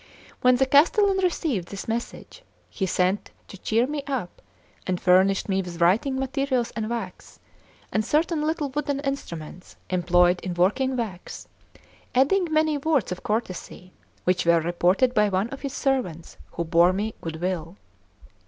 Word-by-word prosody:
When 250 -1 +5
the 265 +2 +3
castellan 380 +9 +4
received 315 - -1
this 200 - -7
message, 235 - -5 0.3
he 190 - -2
sent 185 +3 0 0.2
to - - -11
cheer 225 +4 +1
me 290 +2 -3
up, 255 -11 -4 0.5
and 180 -1 -1
furnished 190 +1 +3
me 195 -1 +1
with 175 -2 -8
writing 200 +11 +3
materials 265 -2 -1
and 220 -1 -3
wax, 230 -6 -6 0.5
and 215 - +1
certain 310 +5 +1
little 305 -1 -1
wooden 285 0 -2
instruments 180 - -6 0.2
employed 180 0 +3
in 180 -1 -5
working 255 +9 +1
wax, 205 -7 -6 0.7
adding 330 +7 +3
many 310 -1 +2
words 290 - +1
of 180 - -4
courtesy, 185 -4 -4 0.3
which 180 0 +1
were 170 0 +4
reported 175 +9 +2
by 210 -3 +3
one 195 +4 0
of 275 - -7
his 275 -2 -4
servants 250 - -2 0.2
who 170 - -2
bore 170 +2 +4
me 210 +3 -2
good 160 -1 -5
will. 175 0 -3
215 Hz, 155 wpm, -25 LUFS, 180-275 Hz, 0.7 s, When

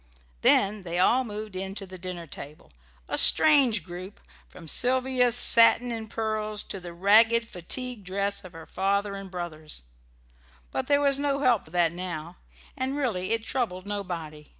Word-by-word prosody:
Then 205 +1 +3
they 175 -1 -5
all 240 +8 +3
moved 215 -3 -7
in 190 +1 -5
to 200 - -6
the 185 -1 -11
dinner 180 -1 -6
table 150 - -10 0.4
a - - 0
strange 265 - +5
group, 180 +4 -10 0.3
from 165 -3 -13
Sylvia's 250 - +2
satin 240 0 +6
and 225 -2 -6
pearls 215 -1 -3
to 195 - -7
the 175 -1 -9
ragged 225 +6 +3
fatigue 240 +6 -3
dress 200 +2 -2
of 185 -2 -12
her 165 0 -11
father 200 +1 -1
and 195 -1 -8
brothers; 160 - -7 0.9
but 130 - -3
there 285 0 +2
was 280 -1 +2
no 280 -1 -1
help 250 -6 +2
for - - -17
that 170 -1 +1
now, 175 -1 -7 0.4
and 265 +2 -3
really 215 -10 -2
it 225 -1 -1
troubled 220 -7 -3
nobody. 170 -7 -6
200 Hz, 165 wpm, -26 LUFS, 180-235 Hz, 0.9 s, satin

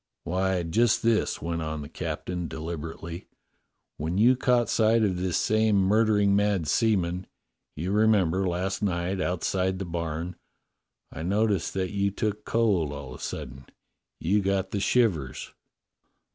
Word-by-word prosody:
"Why, 95 0 0
just 110 +8 +2
this," 115 -7 +1
went 85 0 -2
on 80 -1 -4
the - - -8
captain 85 +2 -4
deliberately. 80 +2 -6 0.7
"When 80 +5 -2
you 120 +5 +5
caught 125 -2 +2
sight 110 0 +3
of 95 -4 +1
this 90 -1 0
same 110 0 +2
murdering 105 +1 +3
mad 100 -4 +1
seaman 90 -3 +1 0.2
— - - -54
you 85 +5 -3
remember, 100 -4 +3
last 90 +2 -2
night, 95 -1 -1
outside 95 +1 0
the 95 - -4
barn 85 0 -4 0.4
— - - -53
I - - -6
noticed 100 +1 0
that 95 -1 -1
you 100 0 +1
took 105 +1 -3
cold 100 -10 +1
all 70 -3 -7
of - - -10
a - - -7
sudden; 65 0 -6 0.5
you 100 +6 +2
got 95 -1 0
the 100 - -1
shivers." 95 - 0
95 Hz, 150 wpm, -27 LUFS, 85-105 Hz, 0.7 s, you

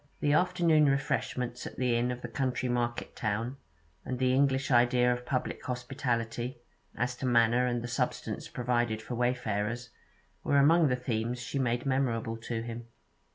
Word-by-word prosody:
The 145 - +2
afternoon 170 -3 +4
refreshments 125 -3 -1
at - - -9
the 125 -2 +1
inn 120 +1 +1
of 125 0 -5
the - - -3
county 130 -1 -1
market 120 -1 -2
town, 115 +4 -2 0.5
and 125 - -3
the 130 0 +2
English 135 0 +2
idea 125 0 +4
of 125 0 -7
public 130 -2 -2
hospitality, 125 -1 -2 0.4
as 125 +1 -1
to 130 - -2
manner 120 +1 +4
and 120 -1 -1
the - - -3
substance 120 - -2
provided 120 -2 0
for 110 - -7
wayfarers, 120 -1 -1 0.5
were 140 - +2
among 160 +3 +6
the 125 - +2
themes 120 -1 -2
she 130 +3 -3
made 120 -1 0
memorable 120 -4 0
to 115 0 -4
him. 115 0 -7
125 Hz, 160 wpm, -30 LUFS, 120-130 Hz, 0.5 s, among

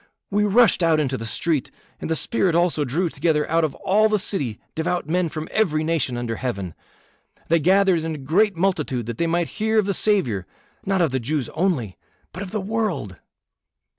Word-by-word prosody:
We 210 +1 +2
rushed 220 -1 +4
out 165 -2 +3
into 135 -3 0
the 115 -3 -5
street, 150 +3 -1 0.3
and - - -5
the 160 - +1
Spirit 185 -1 +1
also 170 -4 +2
drew 155 +7 0
together 155 -1 0
out 165 +1 +2
of 150 -3 -1
all 215 +3 +2
the 215 - +2
city 145 - -2
devout 160 0 -2
men 175 +1 +1
from 155 0 -5
every 155 -8 +1
nation 155 -6 -1
under 115 -2 -3
heaven. 100 -9 -4 0.8
They 165 +1 +4
gathered 185 0 +3
in 160 -1 -3
a - - -6
great 180 +9 +2
multitude 160 - 0
that 115 0 -6
they 170 - +1
might 170 +1 +1 0.2
hear 220 0 +2
of 215 - +4
the 200 - 0
Saviour, 130 - 0 0.4
not 195 -1 +2
of 165 -5 +2
the 130 - 0
Jews 135 +1 -2
only, 155 - -1 0.3
but 185 - -7
of 200 - -5
the 215 - -2
world." 190 - -2
165 Hz, 195 wpm, -23 LUFS, 140-195 Hz, 0.8 s, rushed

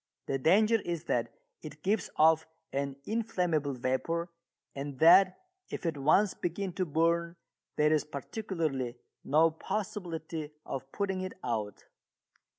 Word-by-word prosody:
The 135 - -1
danger 215 - +4
is 170 -2 -3
that - - -1 0.3
it - - -10
gives 205 +3 +1
off 160 +1 +5 0.3
an 140 0 -1
inflammable 180 - 0
vapour 150 +8 -1 0.4
and 140 0 -5
that 185 +5 +7 0.3
if - - -6
it 165 -2 0
once 155 +9 +3
begin 180 +2 -3
to 185 0 -1
burn 170 +2 +1 0.4
there 150 +1 +3
is 155 - +2
practically 150 - -3 0.3
no 160 +3 +4
possibility 165 -4 -4 0.2
of 135 0 -6
putting 195 -2 -1
it 185 0 -4
out. 110 -4 -3
165 Hz, 130 wpm, -31 LUFS, 140-185 Hz, 0.4 s, that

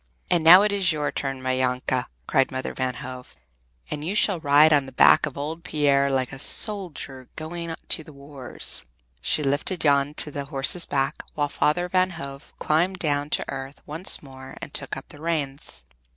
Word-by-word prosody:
"And 170 -2 +3
now 180 +5 +9
it 210 - +1
is 195 -4 +1
your 150 -2 -1
turn, 135 -2 -4
my 130 0 0
Janke!" 125 0 0 0.2
cried 135 -3 +2
Mother 130 0 -4
Van 130 -1 -2
Hove, 130 -2 -9 0.6
"and 150 - -4
you 185 +6 -2
shall 200 -4 +2
ride 150 +1 +5
on 140 -2 +2
the - - -9
back 130 - +5
of 145 - -8
old 155 +4 -5
Pier 140 -2 +2
like 130 -1 -1
a 135 - -8
soldier 155 - +2
going 165 +1 -5
to 160 - +2
the 155 - -13
wars!" 140 -2 -7 0.4
She 150 - -1
lifted 145 +6 -1
Jan 140 0 +2
to 150 - +1
the 140 0 -5
horse's 140 +4 -1
back, 135 -1 -1
while 145 -1 0
Father 165 +5 +1
Van 185 +1 +2
Hove 140 -2 -9
climbed 175 +5 +1
down 145 -4 -1
to - - -1
earth 135 +1 -7
once 160 +4 -4
more 130 -1 -11
and - - -9
took - - 0
up - - -11
the 145 - -12
reins. 140 - -1
145 Hz, 190 wpm, -24 LUFS, 135-160 Hz, 0.6 s, now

